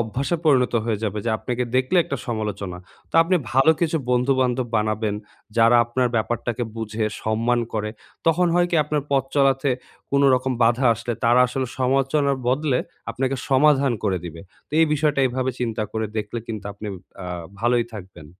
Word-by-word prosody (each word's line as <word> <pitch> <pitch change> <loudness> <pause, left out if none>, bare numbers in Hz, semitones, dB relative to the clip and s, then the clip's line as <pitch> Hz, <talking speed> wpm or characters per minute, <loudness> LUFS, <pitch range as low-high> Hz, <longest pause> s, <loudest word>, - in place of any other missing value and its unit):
অভ্যাসে 130 +9 -1
পরিণত 130 -5 +3
হয়ে 110 -3 -1
যাবে, 105 0 -2
যে 115 - 0
আপনাকে 125 +1 -2
দেখলে 130 +8 +1
একটা 140 -4 -2
সমালোচনা। 105 -5 -3 0.3
তো - - -30
আপনি 180 +2 +2 0.2
ভালো 135 +5 +5
কিছু 165 -1 +1
বন্ধু-বান্ধব 125 0 +1
বানাবেন, 110 0 0 0.4
যারা 115 +1 +6
আপনার 125 +1 0
ব্যাপারটাকে 120 +2 -1
বুঝে, 110 0 -3 0.2
সম্মান 115 +2 +1
করে। 105 0 -1 0.4
তখন 170 +2 +3
হয় 175 0 +4
কি? 170 - +2
আপনার 150 -1 -1
পথ 135 -2 +2
চলাতে 135 -1 +3 0.4
কোন 140 0 +3
রকম 130 +1 0
বাধা 120 +3 +3
আসলে 120 +2 -4
তারা 120 +2 +5
আসলে 130 +1 -2
সমালোচনার 135 +2 +1
বদলে 135 0 +1 0.3
আপনাকে 130 +1 -1
সমাধান 140 -1 +4
করে 95 -3 +1
দিবে। 85 -1 -8 0.3
তো - - -42
এই 165 - +5
বিষয়টা 150 -2 +1
এভাবে 130 +1 -1
চিন্তা 115 -3 -1
করে 110 -1 -1
দেখলে 105 +2 -3
কিন্তু 110 -3 -6
আপনি 105 +1 -9 0.4
আ - - -6 0.3
ভালোই 120 0 +2
থাকবেন। 90 -6 -10
125 Hz, 165 wpm, -23 LUFS, 110-135 Hz, 0.4 s, যারা